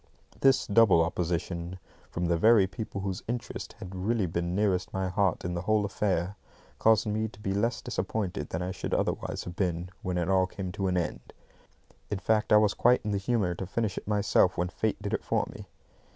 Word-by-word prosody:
This 135 Hz, -1 st, +4 dB
double 100 Hz, -6 st, +5 dB
opposition, 85 Hz, +1 st, -2 dB, 0.3 s
from 85 Hz, -, -2 dB
the 85 Hz, 0 st, +2 dB
very 110 Hz, +3 st, +6 dB
people 100 Hz, +1 st, -5 dB
whose 95 Hz, -1 st, -3 dB
interests 120 Hz, +1 st, -5 dB
had 95 Hz, -4 st, -8 dB
really 100 Hz, +3 st, 0 dB
been 85 Hz, +1 st, -2 dB
nearest 95 Hz, -3 st, +1 dB
my 95 Hz, -1 st, -1 dB
heart 95 Hz, -2 st, 0 dB
in 90 Hz, -, -2 dB
the 85 Hz, -, -2 dB
whole 105 Hz, +2 st, +2 dB
affair, 100 Hz, -1 st, -1 dB, 0.4 s
caused 110 Hz, 0 st, +4 dB
me 110 Hz, +1 st, 0 dB
to 105 Hz, -2 st, -15 dB
be 95 Hz, -2 st, -2 dB
less 115 Hz, +5 st, 0 dB
disappointed 100 Hz, -4 st, -3 dB
than 85 Hz, +2 st, -3 dB
I 90 Hz, -, -2 dB
should -, -, -3 dB
otherwise -, -, -1 dB
have 90 Hz, -, -7 dB
been 90 Hz, -2 st, -1 dB
when 90 Hz, -1 st, -2 dB
it 85 Hz, -1 st, 0 dB
all 95 Hz, -1 st, +3 dB
came 95 Hz, -1 st, -5 dB
to 95 Hz, 0 st, -2 dB
an 90 Hz, -1 st, +1 dB
end. 75 Hz, -8 st, -3 dB, 0.8 s
In 105 Hz, -, -1 dB
fact, 105 Hz, +3 st, +1 dB
I 105 Hz, -, +8 dB
was 105 Hz, -1 st, +4 dB
quite 125 Hz, +1 st, +4 dB
in 105 Hz, -, -1 dB
the 100 Hz, -, 0 dB
humour 100 Hz, -4 st, 0 dB
to 90 Hz, +1 st, -5 dB
finish 105 Hz, -1 st, -1 dB
it -, -, -7 dB
myself 105 Hz, -3 st, +3 dB
when 90 Hz, 0 st, 0 dB
Fate 110 Hz, +3 st, -1 dB
did 100 Hz, -, -3 dB
it -, -, -1 dB
for -, -, +1 dB
me. -, -, -10 dB
95 Hz, 210 wpm, -29 LUFS, 90-105 Hz, 0.8 s, I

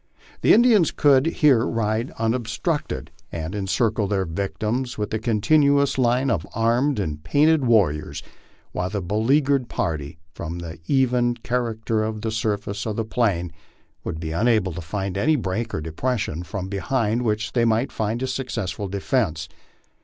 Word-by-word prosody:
The -, -, +4 dB
Indians 220 Hz, -, +6 dB
could 140 Hz, 0 st, +4 dB
here 145 Hz, -8 st, +4 dB
ride 115 Hz, +1 st, -1 dB
unobstructed 115 Hz, +7 st, -2 dB, 0.2 s
and 80 Hz, +2 st, -4 dB
encircle 105 Hz, +1 st, 0 dB
their 95 Hz, -1 st, 0 dB
victims 105 Hz, +8 st, -3 dB
with 105 Hz, 0 st, -3 dB
a 110 Hz, -, 0 dB
continuous 140 Hz, +5 st, +3 dB
line 125 Hz, +1 st, +2 dB
of 85 Hz, -8 st, -1 dB
armed 120 Hz, +6 st, +2 dB
and 75 Hz, -5 st, -3 dB
painted 145 Hz, -, +3 dB
warriors, 95 Hz, -11 st, +1 dB, 0.5 s
while 90 Hz, +1 st, -2 dB
the 100 Hz, +1 st, -2 dB
beleaguered 125 Hz, -, +1 dB
party, 75 Hz, -2 st, -3 dB, 0.2 s
from 85 Hz, +1 st, -5 dB
the 85 Hz, -1 st, -7 dB
even 125 Hz, -3 st, +2 dB
char 125 Hz, -1 st, 0 dB
acter 110 Hz, 0 st, -1 dB
of 110 Hz, -1 st, -6 dB
the 110 Hz, 0 st, -2 dB
surface 105 Hz, -1 st, -2 dB
of 110 Hz, -, -2 dB
the 115 Hz, -, -2 dB
plain, 100 Hz, -8 st, 0 dB, 0.5 s
would 80 Hz, -, -4 dB
be 80 Hz, -1 st, -4 dB
unable 105 Hz, 0 st, +2 dB
to 90 Hz, -, -5 dB
find 95 Hz, +2 st, -3 dB
any 155 Hz, +9 st, +3 dB
break 110 Hz, -2 st, -2 dB
or -, -, -3 dB
depres 120 Hz, +11 st, -1 dB
sion 80 Hz, +3 st, -3 dB
from 95 Hz, +1 st, -5 dB
behind 110 Hz, +4 st, 0 dB
which 105 Hz, -3 st, -1 dB
they 120 Hz, -, +2 dB
might 115 Hz, +4 st, +1 dB
make 110 Hz, +2 st, -1 dB
a -, -, 0 dB
successful 115 Hz, -6 st, -3 dB
defence. 95 Hz, -, -1 dB
110 Hz, 160 wpm, -23 LUFS, 95-125 Hz, 0.5 s, Indians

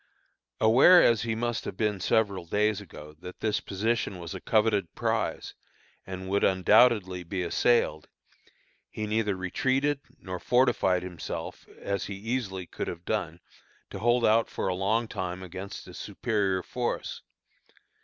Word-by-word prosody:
Aware 130 Hz, +11 st, +7 dB
as 115 Hz, -2 st, +4 dB
he 115 Hz, -1 st, -1 dB
must 120 Hz, 0 st, -2 dB
have -, -, -6 dB
been 105 Hz, -3 st, 0 dB
several 100 Hz, -4 st, +1 dB
days 105 Hz, +2 st, +1 dB
ago, 75 Hz, -5 st, -11 dB
that 90 Hz, +1 st, -10 dB
this 105 Hz, -1 st, 0 dB
position 105 Hz, 0 st, -1 dB
was 85 Hz, +1 st, -7 dB
a 95 Hz, -, -7 dB
coveted 105 Hz, -5 st, +1 dB
prize -, -, -2 dB, 0.5 s
and 95 Hz, 0 st, -6 dB
would 100 Hz, +1 st, +1 dB
undoubtedly 95 Hz, 0 st, +4 dB
be 90 Hz, +1 st, -3 dB
assailed, 85 Hz, -4 st, +1 dB, 0.8 s
he 110 Hz, -, -4 dB
neither 105 Hz, -1 st, 0 dB
retreated, 130 Hz, +10 st, 0 dB, 0.2 s
nor 90 Hz, -1 st, -6 dB
fortified 120 Hz, -8 st, +2 dB
himself 90 Hz, -3 st, -6 dB
as 100 Hz, 0 st, -2 dB
he 100 Hz, -, -5 dB
easily 100 Hz, -3 st, -3 dB
could -, -, -5 dB
have 85 Hz, 0 st, -6 dB
done 90 Hz, -6 st, -2 dB, 0.5 s
to -, -, -6 dB
hold 120 Hz, +1 st, +3 dB
out 110 Hz, +1 st, +3 dB
for -, -, -3 dB
a 95 Hz, -, +1 dB
long 105 Hz, +5 st, 0 dB
time 95 Hz, -3 st, -4 dB
against 95 Hz, +2 st, -8 dB
a -, -, -11 dB
superior 100 Hz, -5 st, -1 dB
force. 125 Hz, -1 st, -3 dB
100 Hz, 145 wpm, -28 LUFS, 95-115 Hz, 0.8 s, Aware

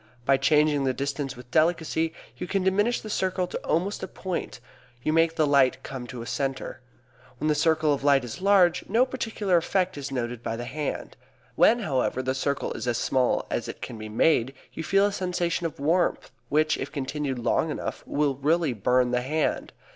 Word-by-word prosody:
By 135 Hz, -, +5 dB
changing 150 Hz, -1 st, +3 dB
the 130 Hz, -1 st, 0 dB
distance 140 Hz, -1 st, -3 dB
with 125 Hz, 0 st, -13 dB
delicacy 160 Hz, 0 st, +1 dB, 0.2 s
you 180 Hz, -, -6 dB
can 195 Hz, 0 st, 0 dB
diminish 205 Hz, +5 st, +2 dB
the -, -, -8 dB
circle 185 Hz, -2 st, 0 dB
to -, -, -5 dB
almost 185 Hz, +6 st, -1 dB
a 190 Hz, -, -4 dB
point, 185 Hz, -2 st, -5 dB, 0.4 s
you 155 Hz, -, +1 dB
make 165 Hz, 0 st, +3 dB
the 155 Hz, -, +3 dB
light 140 Hz, -3 st, +3 dB
come 130 Hz, -3 st, -6 dB
to 120 Hz, 0 st, -7 dB
a -, -, -9 dB
center. 135 Hz, 0 st, -3 dB, 0.6 s
When 155 Hz, +5 st, -1 dB
the -, -, +4 dB
circle 160 Hz, -1 st, +2 dB
of 140 Hz, -, -3 dB
light 140 Hz, -2 st, +4 dB
is 120 Hz, +8 st, -7 dB
large, 190 Hz, -3 st, +4 dB
no 230 Hz, +5 st, +4 dB
particular 220 Hz, -8 st, 0 dB
effect 185 Hz, -1 st, 0 dB
is 140 Hz, 0 st, -5 dB
noted 120 Hz, -3 st, -3 dB
by 115 Hz, -, -3 dB
the 120 Hz, +1 st, -5 dB
hand. 130 Hz, -, -4 dB, 0.4 s
When, 235 Hz, +1 st, +4 dB
however, 130 Hz, -6 st, 0 dB
the 130 Hz, 0 st, 0 dB
circle 140 Hz, +1 st, -2 dB
is -, -, -5 dB
as 120 Hz, -1 st, +1 dB
small 130 Hz, 0 st, +1 dB
as -, -, -2 dB
it -, -, -7 dB
can 110 Hz, -, -7 dB
be 110 Hz, 0 st, -7 dB
made 130 Hz, +3 st, +2 dB, 0.2 s
you 160 Hz, -, -5 dB
feel 195 Hz, +4 st, +3 dB
a 205 Hz, -, +1 dB
sensation 175 Hz, -3 st, -1 dB
of 155 Hz, -, -11 dB
warmth 170 Hz, +5 st, +1 dB, 0.2 s
which, 155 Hz, +1 st, +2 dB
if -, -, -4 dB
continued 140 Hz, -1 st, -3 dB
long 125 Hz, +6 st, +1 dB
enough, 150 Hz, -, -4 dB
will 145 Hz, -1 st, +1 dB
really 155 Hz, 0 st, +1 dB
burn 125 Hz, +3 st, +2 dB
the 125 Hz, 0 st, +1 dB
hand. 150 Hz, +5 st, -1 dB
150 Hz, 200 wpm, -26 LUFS, 130-175 Hz, 0.6 s, By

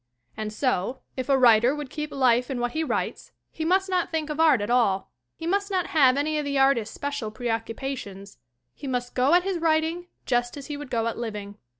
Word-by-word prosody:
And 215 Hz, -1 st, -4 dB
so, 250 Hz, 0 st, -1 dB
if 260 Hz, +1 st, -4 dB
a 275 Hz, -, +5 dB
writer 240 Hz, +1 st, +5 dB
would 295 Hz, -3 st, -6 dB
keep 300 Hz, -1 st, -4 dB
life 250 Hz, -2 st, +2 dB
in 260 Hz, -3 st, -2 dB
what 240 Hz, 0 st, -1 dB
he 320 Hz, +4 st, -1 dB
writes, -, -, -3 dB, 0.2 s
he 320 Hz, -, -5 dB
must 380 Hz, +4 st, +2 dB
not 365 Hz, -2 st, 0 dB
think 315 Hz, -2 st, -2 dB
of 300 Hz, -, -5 dB
art 315 Hz, -6 st, +5 dB
at 205 Hz, +3 st, -2 dB
all. 220 Hz, -6 st, +2 dB, 0.2 s
He 325 Hz, -, -8 dB
must 400 Hz, +4 st, 0 dB
not 370 Hz, -3 st, 0 dB
have 270 Hz, -4 st, +5 dB
any 305 Hz, +1 st, 0 dB
of 295 Hz, -, -3 dB
the 280 Hz, -1 st, -1 dB
artist's 270 Hz, -5 st, +2 dB
special 285 Hz, -6 st, -3 dB
preoccupations. 225 Hz, -, -5 dB, 0.3 s
He 280 Hz, -, -9 dB
must 245 Hz, -1 st, -2 dB
go 265 Hz, +6 st, +4 dB
at 355 Hz, -, +4 dB
his 380 Hz, -2 st, -2 dB
writing 325 Hz, +2 st, +1 dB, 0.2 s
just 245 Hz, +1 st, 0 dB
as 280 Hz, -, -8 dB
he 295 Hz, -, -5 dB
would 290 Hz, -2 st, -8 dB
go 230 Hz, -2 st, 0 dB
at 230 Hz, -, -3 dB
living. 210 Hz, -3 st, -6 dB
270 Hz, 220 wpm, -25 LUFS, 235-315 Hz, 0.3 s, a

